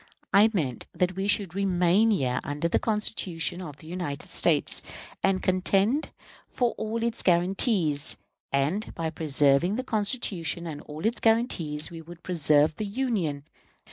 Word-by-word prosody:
I 205 +3 +7
meant 140 - -2
that 180 +1 0
we 195 +1 -2
should 200 -4 +2
remain 190 +2 +3
here 135 - +1
under 145 +3 -2
the - - +1
Constitution 185 -6 -2
of 150 -6 -8
the 155 - -14
United 170 -4 -5
States - - +3 0.4
and 190 -1 +1
contend 195 +9 +1 0.4
for 245 -2 0
all 220 +1 -3
its 235 0 0
guarantees; 175 - +1 0.3
and 145 +10 -1
by 160 -1 -2
preserving 150 +3 +2
the 255 - -2
Constitution 205 -7 -1
and 150 -3 -6
all 155 +3 -8
its 230 +2 +1
guarantees 175 -11 +1
we 165 -1 -8
would 170 +1 -13
preserve 155 -3 +3
the 215 - -2
Union. 200 - -1
180 Hz, 145 wpm, -27 LUFS, 155-210 Hz, 0.4 s, I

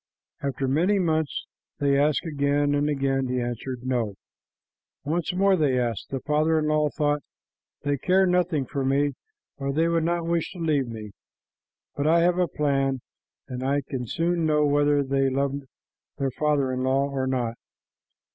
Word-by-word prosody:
After 135 -1 -2
many 175 +10 +2
months 160 -5 0 0.3
they 140 -1 +2
asked 145 +4 +2
again, 145 -1 +1
and 145 +1 +1
again 135 -2 0
he 125 0 -1
answered, 120 +1 -4
"No." 120 -6 -1 0.9
Once 160 +3 -1
more 195 +1 +3
they 145 -7 +2
asked. 115 -4 -2
The 135 -2 -3
father 155 +3 +2
in 155 - +1
law 150 -1 +2
thought, 145 0 0 0.6
"They 145 -1 0
care 190 +5 +3
nothing 180 -5 +1
for 140 +1 -3
me, 140 +2 +2 0.4
or 140 0 -2
they 160 +4 +2
would 170 -1 +1
not 170 0 0
wish 170 -1 -1
to - - -11
leave 155 -6 +1
me, 110 -3 -7 0.8
but 145 +1 0
I 170 +2 +5
have 175 +1 +3
a 180 - +3
plan, 135 -3 0 0.5
and 125 -1 -5
I 140 +2 +1
can 125 -3 -3
soon 170 +5 0
know 150 -1 +3
whether 145 0 +3
they 135 0 +1
love 135 +1 0 0.6
their 135 -1 -1
father 140 -2 +1
in 130 - -2
law 135 +2 +2
or 135 -2 -2
not." 125 -3 -1
145 Hz, 170 wpm, -25 LUFS, 135-160 Hz, 0.9 s, I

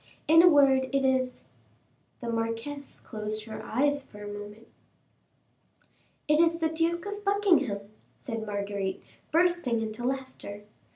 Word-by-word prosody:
In 325 +2 +8
a 355 - +8
word, 275 -4 +5
it 270 +1 0
is 260 -1 +1 0.4
" 110 - -40
The 235 - -4
marquise 230 +5 -3
closed 215 -1 -4
her 220 -1 -7
eyes 285 +4 +1
for 210 -6 -12
a - - -6
moment. 205 +2 -8 1.6
"It 300 +1 +4
is 335 0 +4
the 325 -1 +1
Duke 335 +2 0
of 410 0 -5
Buckingham," 350 - +2 0.4
said 225 -3 -5
Marguerite, 200 -2 -3 0.3
bursting 340 -8 +2
into 220 +1 -4
laughter. 260 -5 -4
260 Hz, 135 wpm, -28 LUFS, 215-320 Hz, 1.6 s, In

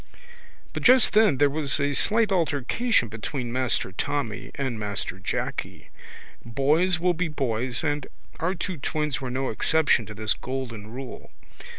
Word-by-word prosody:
But - - -4
just 255 -1 +6
then 210 -9 +5
there 145 - +5
was 150 -1 0
a 140 0 +1
slight 215 - +3
altercation 170 - +1
between 115 +3 -5
Master 130 -6 0
Tommy 115 +1 -3
and 130 -5 -3
Master 100 -2 -3
Jacky. - - -4 0.5
Boys 150 +9 +2
will 180 +1 +2
be 175 +1 -1
boys 125 -4 -1
and 145 -2 -1 0.3
our 180 +4 0
two 185 0 -4
twins 150 -1 -2
were 130 - -4
no 130 +2 -2
exception 145 -1 +2
to 105 - -8
this 110 0 +1
golden 120 -5 -6
rule. 130 +2 -8
140 Hz, 150 wpm, -25 LUFS, 120-160 Hz, 0.5 s, just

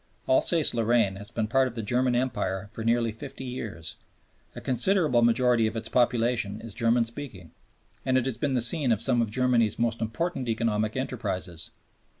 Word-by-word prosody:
Alsace 155 +4 +4
Lorraine 115 -4 +2
has 100 +1 -9
been 110 - -2
part 130 +3 +3
of 120 - -8
the 115 - -4
German 125 +3 +1
Empire 100 -6 -1
for 110 - -6
nearly 115 0 +1
fifty 130 +4 -8
years 115 -10 -5 0.6
a - - -6
considerable 130 - +2
majority 120 -1 +3
of 110 - -4
its 115 0 -3
population 120 -4 +1
is 115 -3 -8
German 115 +2 +2
speaking 115 - -7 0.5
and 130 0 +2
it 130 - +1
has 130 -4 -3
been 140 -3 0
the 125 - +2
scene 130 +2 +2
of 110 - +2
some 120 0 +3
of 115 - -1
Germany's 120 -2 +1
most 115 -1 -1
important 130 +3 -2
economic 110 0 0
enterprises. 95 -10 -4
120 Hz, 175 wpm, -27 LUFS, 110-130 Hz, 0.6 s, Alsace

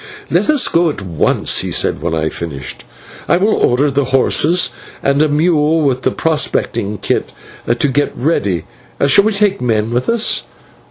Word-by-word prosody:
"Let - - +1
us 290 -5 +4
go 170 0 +2
at 125 -9 -6
once," 85 -5 +1
he - - -3
said - - 0
when 80 -1 -2
I 80 - -1
had 80 - -2
finished. 70 -7 -7 0.4
"I - - +3
will 205 +4 +2
order 140 +4 +2
the 140 0 0
horses 150 +6 +2 0.3
and 140 +1 +2
a 155 - +3
mule 155 0 +2
with 130 -3 0
the - - +1
prospecting 120 -9 -1
kit - - -2 0.4
to 120 - +2
be 125 +4 +1
got 145 +1 +1
ready. 100 - -1 0.4
Shall 170 +9 +4
we 220 - +2
take 200 -1 0
men 110 -2 0
with 125 +1 -1
us?" 230 -1 +1
140 Hz, 180 wpm, -15 LUFS, 110-165 Hz, 0.4 s, us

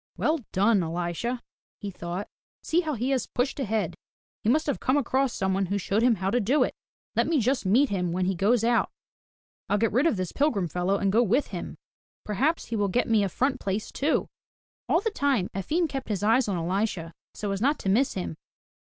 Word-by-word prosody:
"Well 315 +1 +1
done, 200 +1 +3
Elisha!*' 175 +9 -2 0.4
he 205 -2 -5
thought. 175 +2 -5 0.4
"See 330 - +2
how 310 -4 -2
he 250 +4 -1
has 260 -3 0
pushed 255 +3 -1
ahead. 215 - -1 0.5
He 215 - 0
must 310 +6 +3
have 285 - -1
come 260 +2 +2
across 270 -1 +1
someone 190 -1 0
who 200 +3 0
showed 200 +2 0
him 240 -1 +4
how 190 0 -1
to 245 - +2
do 250 +7 +3
it. - - -2 0.4
Let - - +2
me 320 -3 +2
just 250 -2 +1
meet 250 +8 +4
him 180 -3 -1
when 180 +1 0
he 190 - +1
goes 210 +6 +2
out, 235 0 +2 0.8
ril 205 - +3
get 225 +1 +1
rid 260 +9 +3
of 230 - +1
this 185 -2 -2
pilgrim 275 - +1
fellow 180 +4 0
and 195 -1 +1
go 225 +4 +4
with 245 +5 +2
him. - - -6 0.5
Per 210 - -3
haps 300 - +1
he 230 - -4
will 205 -2 +1
get 245 +7 +1
me 220 -2 +3
a 195 - 0
front 260 +7 0
place 200 +2 -3
too!*' 295 +3 0 0.6
All 335 - +3
the 450 - -1
time 275 - +1
Efim 310 - 0
kept 270 -4 -5
his 205 -2 -1
eyes 230 +3 +3
on 195 -3 -1
Elisha, 175 -1 -2 0.2
so 205 -1 -3
as 195 0 -2
not 285 +5 +2
to - - -6
miss 245 +8 +2
him. 85 -3 -4
215 Hz, 220 wpm, -27 LUFS, 190-265 Hz, 0.8 s, him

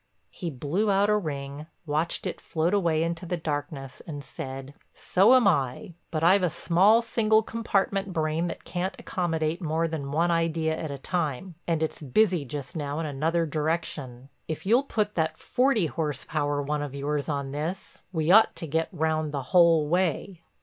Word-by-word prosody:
He 175 - -5
blew 155 +10 -1
out 200 +1 +3
a - - +4
ring, 145 -5 -4 0.2
watched 155 +2 -1
it - - -4
float 165 +3 -1
away 165 -5 +2
into 170 +1 -3
the 180 - -1
darkness 145 -4 -4
and 145 -3 -6
said: 135 +1 -7 0.2
"So 200 +8 +4
am 250 -5 +5
I. 140 -1 0 0.2
But 160 -1 -2
I've 185 +4 +6
a 180 - +2
small, 195 +9 +4
single 220 -1 +3
compartment 200 -3 -1
brain 160 0 0
that 170 - -6
can't 185 +2 -3
accommodate 165 -2 -1
more 165 0 0
than 150 -4 -4
one 170 +4 +2
idea 165 -1 +1
at 160 - -5
a 140 - -5
time. 170 +2 -3
And 165 -2 +1
it's 160 - -3
busy 170 - +2
just 135 -2 -6
now 145 -2 -3
in 165 - -2
another 160 +4 0
direction. 150 -5 -3 0.2
If 160 +2 -5
you'll 235 +6 +5
put 210 -5 -1
that 160 -1 -1
forty 250 -6 +2
horse 150 -3 -3
power 145 -2 -1
one 150 +1 -1
of 145 -2 -5
yours 145 +1 -2
on 140 -2 -2
this 155 +6 -5
we 160 -1 +1
ought 220 +3 +6
to 165 - -5
get 160 +2 -1
round 155 -2 0
the 140 -2 -3
whole 170 -4 +6
way." 175 +1 0
160 Hz, 180 wpm, -27 LUFS, 145-180 Hz, 0.2 s, I've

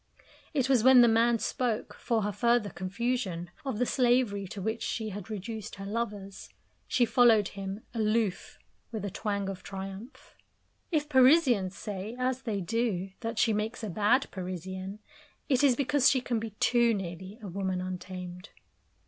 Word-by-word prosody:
It 265 -3 +2
was 260 -5 +3
when 260 -1 +8
the 240 - +7
man 230 +1 +4
spoke, 235 -1 -2
for 225 -3 -1
her 210 - -1
further 235 0 +2
confusion, 185 -2 -2
of 265 -6 -3
the 250 - +2
slavery 240 -6 +2
to 200 - -7
which 220 +4 -2
she 220 -2 -2
had 200 -1 -7
reduced 215 +1 -6
her 195 - -8
lovers; 205 -2 -4 0.4
she 245 - +3
followed 230 -3 +5
him, 195 +1 -6
aloof, 215 -3 0 0.3
with 215 -3 -4
a 200 - -3
twang 200 -1 -2
of 195 -1 -5
triumph. 195 +7 -8 0.6
If 300 -3 +1
Parisians 260 - +4
say, 205 +2 -5
as 255 0 -1
they 210 -6 -2
do, 195 -1 -1
that 225 0 -4
she 225 -1 +3
makes 215 +3 -2
a 210 - -3
bad 215 +8 +3
Parisienne, 185 +1 -5 0.5
it 260 -1 +2
is 270 -3 +5
because 280 +1 +3
she 265 - +3
can 245 -2 -1
be 225 0 -4
too 235 -2 +4
nearly 190 +2 -6
a 210 - -8
woman 190 0 -2
untamed. 180 0 -6
215 Hz, 165 wpm, -29 LUFS, 195-240 Hz, 0.6 s, when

